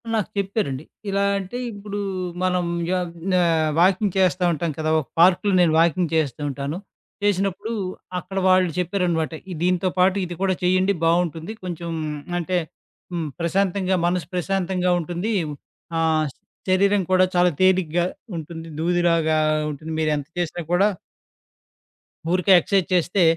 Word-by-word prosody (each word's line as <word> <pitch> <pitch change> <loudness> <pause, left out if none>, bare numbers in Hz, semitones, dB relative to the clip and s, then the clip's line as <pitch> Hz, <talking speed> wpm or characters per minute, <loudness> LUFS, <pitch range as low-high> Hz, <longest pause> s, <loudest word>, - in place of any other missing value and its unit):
నాకు 215 - -1
చెప్పారండి. 195 -9 -1 0.3
ఇలా 195 0 +1
అంటే 195 +5 -5
ఇప్పుడు 205 0 -6 0.4
మనం 180 -1 +1 0.3
యా 185 - +2 0.4
ఆహ్, 165 -2 +2
వాకింగ్ 190 +2 +3
చేస్తా 185 -1 +2
ఉంటాం 160 +1 -2
కదా! 155 0 0
ఒక 145 - -6
పార్కులో 185 +3 +5
నేను 165 -3 +4
వాకింగ్ 170 0 +2
చేస్తూ 150 -3 0
ఉంటాను. 140 +4 -4 0.5
చేసినప్పుడు 200 +2 0 0.5
అక్కడ 190 +2 -8
వాళ్ళు 185 -1 +4
చెప్పారన్నమాట. 175 -3 0 0.2
ఈ - - -3
దీంతో 180 +1 +2
పాటు 190 +2 +4
ఇది 175 0 -6
కూడా 190 -1 +2
చేయండి 185 +2 +3
బావుంటుంది. 165 +2 0
కొంచెం 170 -2 -5 0.5
అంటే 180 +2 -1 0.5
హ్మ్, 165 -3 -2
ప్రశాంతంగా, 185 +2 +1
మనసు 175 -3 0
ప్రశాంతంగా 180 0 0
ఉంటుంది. 175 +7 -3 0.7
ఆహ్, 160 -1 +2 0.4
శరీరం 200 +2 +3
కూడా 185 0 +5
చాలా 175 0 +4
తేలికగా 175 -2 +3 0.3
ఉంటుంది. 165 +1 -7
దూదిలాగా 165 -2 +2 0.3
ఉంటుంది 155 +3 -7
మీరెంత 150 -2 0
చేసినా 175 0 -2
కూడా 195 +4 +4 1.4
ఊరికే 185 +2 +2
ఎక్సర్సైజ్ 190 +1 +1
చేస్తే 180 +2 +2
180 Hz, 130 wpm, -23 LUFS, 165-190 Hz, 1.4 s, పార్కులో